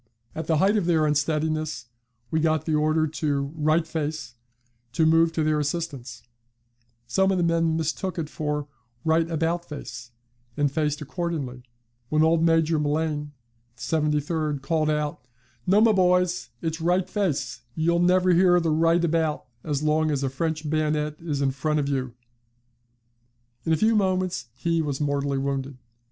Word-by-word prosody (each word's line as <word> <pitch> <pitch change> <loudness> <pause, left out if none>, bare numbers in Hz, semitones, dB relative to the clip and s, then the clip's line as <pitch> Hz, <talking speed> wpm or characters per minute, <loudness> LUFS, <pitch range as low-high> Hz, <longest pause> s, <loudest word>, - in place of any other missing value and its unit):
At 160 - -5
the 160 - +2
height 195 +6 +3
of 185 -5 0
their 160 -3 +3
unsteadiness 155 -2 0 0.5
we 160 - +1
got 155 -1 +1
the 160 - -1
order 155 +1 +2
to 145 -2 -2
'right 155 +1 +2
face' 155 -6 -4 0.6
to 160 - +2
move 165 +1 +4
to 160 - 0
their 155 0 +2
assistance; 140 -6 -4 0.8
some 190 +11 +2
of 190 - +1
the 175 - +1
men 165 -1 +2
mistook 165 +3 -2
it 160 -3 -2
for 150 -1 -3 0.4
'right 160 +1 +2
about 165 +1 0
face,' 130 -5 -8 0.5
and 145 -1 +2
faced 150 0 -1
accordingly, 150 -5 -4 0.5
when 155 0 +3
old 160 0 +3
Major 165 -1 +3
M'Laine, 150 0 -1 0.4
73d, 150 +2 -1
called 155 +2 +1
out, 150 -4 -2 0.4
'No, 195 +3 +5
my 225 0 +6
boys, 180 -2 +2
its 160 0 -2
"right 175 +2 +1
face;" 155 - -2
you'll 170 +2 +2
never 180 +1 +4
hear 175 0 +5
the 165 -2 0
right 165 +2 +3
about 160 -2 0 0.2
as 150 -1 -2
long 155 +1 +2
as 140 -2 -1
a 135 - -1
French 155 +2 -2
bayonet 150 0 0
is 145 -4 -2
in 135 - +2
front 150 +3 -1
of 140 - -1
you!' 130 -3 -2 1.5
In 165 - 0
a 160 - +4
few 220 +7 +3
moments 185 - 0
he 165 +5 0
was 145 -3 -3
mortally 140 -1 0
wounded. 135 -1 -3
155 Hz, 160 wpm, -25 LUFS, 145-165 Hz, 1.5 s, my